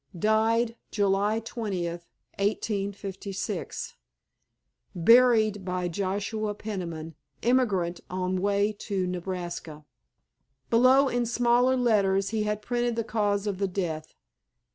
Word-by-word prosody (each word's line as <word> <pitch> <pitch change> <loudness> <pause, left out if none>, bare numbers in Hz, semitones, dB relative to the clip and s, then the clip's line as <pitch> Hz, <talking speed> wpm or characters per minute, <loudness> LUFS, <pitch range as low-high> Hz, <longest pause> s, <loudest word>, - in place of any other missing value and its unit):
Died 225 +4 +2
July 205 +1 +1
20th, 180 -7 -4 0.3
1856. 200 -1 -3 1.0
Buried 220 +1 +5
by 180 -1 -2
Joshua 205 +4 -2
Peniman, 170 -7 -5 0.3
emigrant, 205 -9 +1
on 185 0 -1
way 205 +1 +2
to 195 -3 -2
Nebraska." 175 -4 -5 0.9
Below 255 +4 +6
in 245 -2 0
smaller 245 +2 +3
letters 200 -5 +2
he 220 0 -1
had 210 0 -2
printed 240 0 0
the 230 - -1
cause 205 -2 0
of 200 -3 -2
the 200 - +1
death. 165 -5 -4
205 Hz, 100 wpm, -27 LUFS, 185-225 Hz, 1.0 s, Below